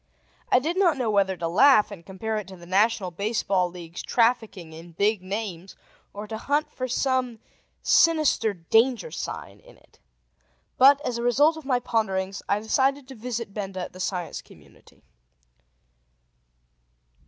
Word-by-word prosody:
I - - +6
did 320 +8 -1
not 350 -6 +3
know 240 -4 0
whether 195 -2 +1
to 165 0 -2
laugh 210 +5 +5
and 185 -5 -10
compare 205 +4 -4
it 210 -4 -5
to 190 - -10
the 170 -1 -14
National 195 0 +1
Baseball 200 -1 0
League's 170 -1 -9
trafficking 220 -8 0
in 165 +2 -12
"big 200 +3 +1
names," 195 -2 -6 0.4
or 205 +1 -7
to 220 0 -6
hunt 290 +5 -1
for 255 - -4
some 255 -2 -1 0.5
sinister 310 -9 +3
danger 225 - +1
sign - - -7
in - - -19
it. - - -27 0.8
But, 280 +2 +7
as 235 -1 -2
a - - -3
result 285 +7 +3
of 315 -3 -10
my 255 -3 +1
ponderings, 195 -5 -2
I 200 - +2
decided 265 +5 0
to - - -8
visit 230 -3 -5
Benda 195 -3 -5
at - - -7
The 185 - -12
Science 180 -2 -3
Community. - - -20
220 Hz, 155 wpm, -25 LUFS, 190-255 Hz, 0.8 s, But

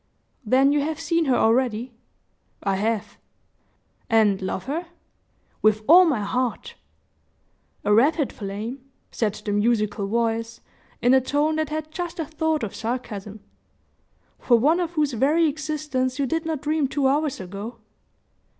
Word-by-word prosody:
"Then 260 +5 +4
you 290 0 +2
have 315 +2 -3
seen 330 0 0
her 260 -3 +2
already?" 240 +1 +1 0.7
"I 195 -1 +1
have." 220 +1 -2 0.9
"And 215 -4 +3
love 190 0 -3
her?" 320 +6 -4 0.7
"With 215 0 +3
all 360 +4 +8
my 280 -10 +1
heart!" 250 - -2 1.1
"A 210 - +3
rapid 285 +6 +3
flame," 215 +6 -6 0.3
said 215 -3 -1
the 205 - -1
musical 210 -1 +1
voice, 230 +1 -1 0.4
in 245 +2 +5
a 265 - +5
tone 295 +4 0
that 315 -1 -1
had 310 0 -4
just 350 +1 -5
a 325 - -2
thought 315 -1 -1
of 210 - -4
sarcasm; 215 -3 -5 1.0
"for 240 - +4
one 305 +9 +3
of 345 -1 -2
whose 300 -4 0
very 295 +8 +3
existence 295 -4 -2
you 280 - +1
did 325 +4 -2
not 315 -4 -3
dream 305 -1 +1
two 275 +1 -1
hours 290 +1 0
ago." 200 +5 -7
260 Hz, 145 wpm, -24 LUFS, 220-310 Hz, 1.1 s, all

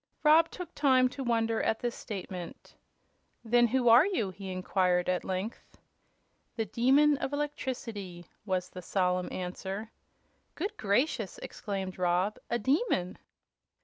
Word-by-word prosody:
Rob 315 +2 +6
took 360 -3 -8
time 260 -3 +4
to 270 +2 -6
wonder 230 -2 +1
at 220 - 0
this 240 -1 -1
statement. 185 -4 -7 0.7
"Then 240 +1 +4
who 245 +1 +1
are 235 +4 +8
you?" 230 - -1
he 190 0 -7
inquired, 185 -1 +1
at 180 -1 0
length. 190 +4 -5 0.8
"The 225 - -1
Demon 270 +8 +4
of 275 - -3
Electricity," 230 -11 -4 0.2
was 185 -3 -2
the 185 - -8
solemn 180 -1 0
answer. 190 +4 -5 0.6
"Good 390 +6 -3
gracious!" 220 - 0
exclaimed 190 -3 -5
Rob, 180 +3 +1
"a 235 - +1
demon!" 240 - 0
220 Hz, 130 wpm, -30 LUFS, 185-260 Hz, 0.8 s, are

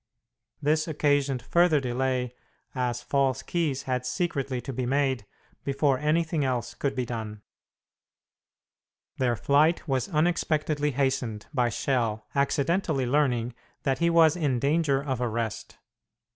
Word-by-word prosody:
This 155 +2 +2
occasioned 145 -4 +1
further 170 +2 +3
delay, 125 -1 -1 0.4
as 125 -1 -2
false 135 -2 +1
keys 155 -6 -1
had 125 -1 -1
secretly 135 -3 -2
to 135 - -6
be 125 0 -2
made 135 -5 0 0.4
before 140 -1 +1
anything 155 +1 +1
else 125 -4 -1
could 140 -1 -2
be 125 -1 -1
done. 110 -3 -6 1.8
Their 125 -2 +2
flight 150 +9 +2
was 135 +4 0
unexpectedly 155 -3 +1
hastened 130 -5 -1
by 125 -3 +2
Schell 115 -2 -1
accidentally 140 +1 +1
learning 125 -3 +1 0.3
that 135 -1 0
he 170 0 +3
was 165 -1 +5
in 145 -7 0
danger 140 +1 +1
of 130 -4 -2
arrest. 115 -2 -3
135 Hz, 125 wpm, -27 LUFS, 125-150 Hz, 1.8 s, was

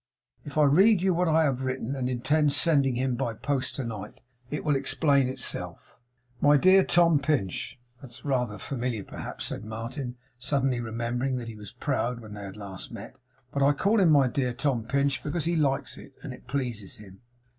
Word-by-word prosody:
If 145 - -8
I 155 - +6
read 185 +7 +5
you 190 -1 +3
what 180 +1 +1
I 160 0 +4
have 135 -4 0
written 130 0 -2
and 130 -2 -2
intend 145 +4 +2
sending 140 -6 +3
to - - -2
him 130 -1 0
by 120 -3 -2
post 135 +2 -2
to 135 - -3
night 105 -3 -7 0.3
it 150 - -4
will 150 -2 +3
explain 140 0 +2
itself. 130 -1 -3 0.4
"My 145 0 +6
dear 185 +6 +6
Tom 170 -4 +4
Pinch." 135 - -1 0.2
That's 130 0 -12
rather 125 -6 0
familiar 120 -1 -3
perhaps,' - - -6
said - - -4
Martin, 115 +4 -5 0.2
suddenly 135 -1 0
remembering 120 +3 -2
that 120 -2 -5
he 115 - -8
was 105 -2 -10
proud 120 +2 -1
when 110 -3 -10
they 105 - -8
had 95 +1 -9
last 95 -3 -7
met, - - -9 0.4
'but 140 - -2
I 140 +1 +5
call 205 +9 +2
him 185 -4 +5
my 140 -4 +5
dear 125 -1 -1
Tom 125 -3 -1
Pinch 140 +2 0
because 155 +2 -2
he 170 +1 +1
likes 140 -4 0
it, 135 - -13
and 140 -5 -6
it 125 - -15
pleases 120 -7 -3
him. 95 -2 -14
135 Hz, 200 wpm, -27 LUFS, 120-145 Hz, 0.4 s, I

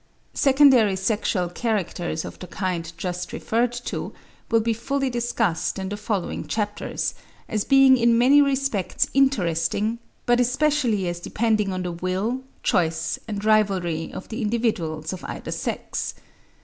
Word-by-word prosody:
Secondary 265 -7 +5
sexual 190 -2 0
characters 175 -5 -2
of - - -9
the 180 - -8
kind 175 -4 -3
just 180 +1 -4
referred 235 +2 0
to, 240 0 -5 0.4
will 230 - +4
be 225 +1 +1
fully 270 +4 -1
discussed 230 -8 0
in 190 0 -4
the 205 - -3
following 205 -3 -3
chapters, 210 -1 -2 0.3
as 215 -2 -1
being 270 -1 +6
in 235 -1 +4
many 270 +5 +6
respects 275 -8 0
interesting, 215 -4 +1 0.3
but 240 0 +3
especially 250 -5 +1
as 175 0 -3
depending 215 +1 0
on 185 0 -3
the 180 - -3
will, 185 +8 -2 0.2
choice, 160 -2 +1
and 205 -1 -4
rivalry 190 -7 +1
of - - -8
the 230 +3 -4
individuals 195 -9 -1
of 185 - -8
either - - -6
sex. - - -3
215 Hz, 140 wpm, -24 LUFS, 180-240 Hz, 0.4 s, being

